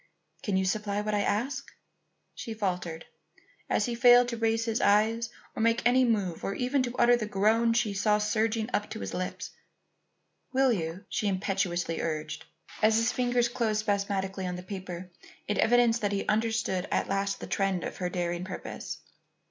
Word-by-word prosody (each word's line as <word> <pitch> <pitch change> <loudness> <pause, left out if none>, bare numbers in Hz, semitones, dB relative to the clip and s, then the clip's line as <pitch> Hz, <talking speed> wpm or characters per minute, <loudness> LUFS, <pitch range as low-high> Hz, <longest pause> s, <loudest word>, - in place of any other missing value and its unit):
"Can 200 -3 0
you 190 - +1
supply 205 +1 -1
what 210 0 -2
I 205 - +2
ask?" 245 +7 -1 0.6
she 225 - -6
faltered, 180 -5 -3 0.6
as - - +2
he 240 - -2
failed 245 +1 +6
to 235 - -3
raise 225 0 +1
his 225 0 -1
eyes 220 +3 +3 0.3
or - - -2
make 230 +1 +2
any 255 +2 +5
move 200 -7 0
or 195 - -2
even 255 +2 +1
to 245 -1 -3
utter 245 0 +6
the 225 -3 -3
groan 220 +3 +3
she 230 -3 +1
saw 210 +1 +2
surging 215 +1 0
up 205 - 0
to - - -6
his 95 -1 -5
lips. 185 0 -4 1.0
"Will 265 -1 +4
you?" 170 -1 -4
she 210 - -1
impetuously 185 -3 -1
urged, 155 -1 -4 0.4
as 215 0 +5
his 230 +2 +2
fingers 245 -1 +1
closed 225 -3 0
spasmodically 200 -2 -1
on 180 - -3
the 180 - -7
paper, 185 -2 -7 0.4
in 205 - -1
evidence 240 0 +4
that 205 -2 -1
he 200 - -1
understood 220 -4 0
at - - 0
last 195 0 -1
the - - -6
trend 195 -3 0
of - - -5
her 180 -1 -2
daring 175 0 -2
purpose. 185 - -6
210 Hz, 180 wpm, -29 LUFS, 190-230 Hz, 1.0 s, failed